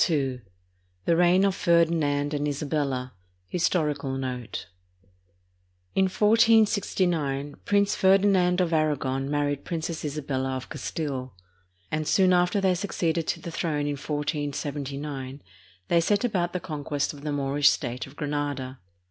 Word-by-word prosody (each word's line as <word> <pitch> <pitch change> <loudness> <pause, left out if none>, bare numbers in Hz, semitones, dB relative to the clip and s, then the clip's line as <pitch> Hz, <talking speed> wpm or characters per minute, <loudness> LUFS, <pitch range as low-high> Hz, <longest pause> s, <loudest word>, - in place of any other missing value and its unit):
II 135 -5 0 0.6
THE 170 - +3
REIGN 175 +3 +4
OF 195 - +2
FERDINAND 160 -5 +2
AND 145 0 -1
ISABELLA 140 -3 -2 0.4
HISTORICAL 150 -6 0
NOTE 125 -3 -4 1.3
In 190 - +3
1469, 190 -9 +2
Prince 200 0 +3
Ferdinand 190 -2 +4
of 170 -2 0
Aragon 140 -4 0
married 145 -1 -1
Princess 165 -1 -4
Isabella 135 -3 -2
of 130 - -6
Castile, 135 - -4 0.6
and 155 -1 -1
soon 185 0 +4
after 180 +3 +3
they 190 -1 +3
succeeded 170 -3 -1
to - - -1
the 170 - -7
throne 155 -3 -1
in 145 - -1
1479, 145 -1 -4 0.4
they 170 - +3
set 205 +5 +1
about 180 -7 0
the 180 - -1
conquest 145 -4 -3
of 145 - -11
the 150 0 -3
Moorish 140 0 +3
state 125 +2 -2
of 135 - -15
Granada. 145 -3 -3
150 Hz, 130 wpm, -26 LUFS, 140-175 Hz, 1.3 s, REIGN